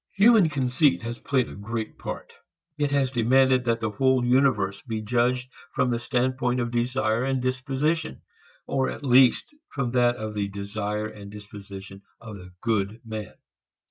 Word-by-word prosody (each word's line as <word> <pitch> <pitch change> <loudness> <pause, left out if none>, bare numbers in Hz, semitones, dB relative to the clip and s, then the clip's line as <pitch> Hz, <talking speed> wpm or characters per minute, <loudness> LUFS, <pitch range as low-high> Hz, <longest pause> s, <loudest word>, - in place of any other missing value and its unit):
Human 205 -3 +6
conceit 135 -1 +1
has 120 +1 -5
played 130 -3 0
a - - -9
great 110 +2 -5
part. - - -7 0.4
It 145 -2 0
has 140 -2 +1
demanded 130 +1 +3
that 115 -1 +1
the 110 -1 -1
whole 130 +1 +2
universe 125 -6 +2
be 115 -4 -4
judged 125 +3 0 0.2
from 125 - +1
the 120 - 0
standpoint 125 +1 0
of 120 -1 -2
desire 120 -1 0
and 135 0 0
disposition, 135 +5 -1 0.4
or 135 -1 0
at - - -7
least 130 - +4 0.2
from 125 -4 -2
that 120 -1 +3
of 110 -2 -5
the 100 -1 -1
desire 100 +1 -4
and 105 -2 -9
disposition 100 -2 -10 0.2
of 110 -2 -9
the 90 0 -12
good 110 -1 -1
man. 110 -2 -6
120 Hz, 160 wpm, -25 LUFS, 110-130 Hz, 0.4 s, Human